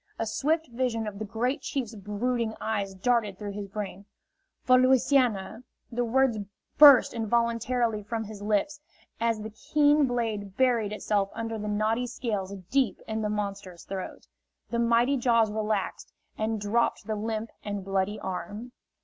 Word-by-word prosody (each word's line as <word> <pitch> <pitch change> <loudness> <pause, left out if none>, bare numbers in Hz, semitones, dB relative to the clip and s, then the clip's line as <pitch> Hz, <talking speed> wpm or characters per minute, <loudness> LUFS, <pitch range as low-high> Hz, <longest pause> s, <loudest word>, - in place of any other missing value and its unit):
A 225 - -1
swift 315 +8 0
vision 235 -2 -1
of 205 -2 -6
the 215 - -3
Great 245 +7 -1
Chief's 255 -5 -3
brooding 220 +3 -2
eyes 200 -3 -2
darted 210 -1 +1
through 205 -1 -5
his 200 0 -6
brain. 200 -1 -6 0.6
"For 255 0 +5
Louisiana!" 255 -4 +2 0.3
The 245 +1 0
words 245 -1 +2 0.4
burst 285 -5 +9
involuntarily 235 0 0
from 225 +2 -3
his 210 -1 -9
lips 215 +8 0 0.4
as 230 -1 +1
the 220 +1 -6
keen 290 +5 +3
blade 220 -5 -3
buried 240 -5 +2
itself 205 -2 0
under 225 0 -4
the 210 - -4
knotty 215 +4 0
scales 210 -6 -3 0.2
deep 270 -3 +2
in 220 0 -2
the 210 - -1
monster's 200 -4 -4
throat. 190 -1 -6 0.5
The 235 - 0
mighty 235 +4 +3
jaws 230 -3 +3
relaxed 210 -2 -2 0.2
and 220 0 -1
dropped 210 +4 0
the 220 - -2
limp 220 +1 -3
and 205 -2 -4
bloody 195 +2 -1
arm. 205 +5 -5
220 Hz, 150 wpm, -27 LUFS, 205-245 Hz, 0.6 s, burst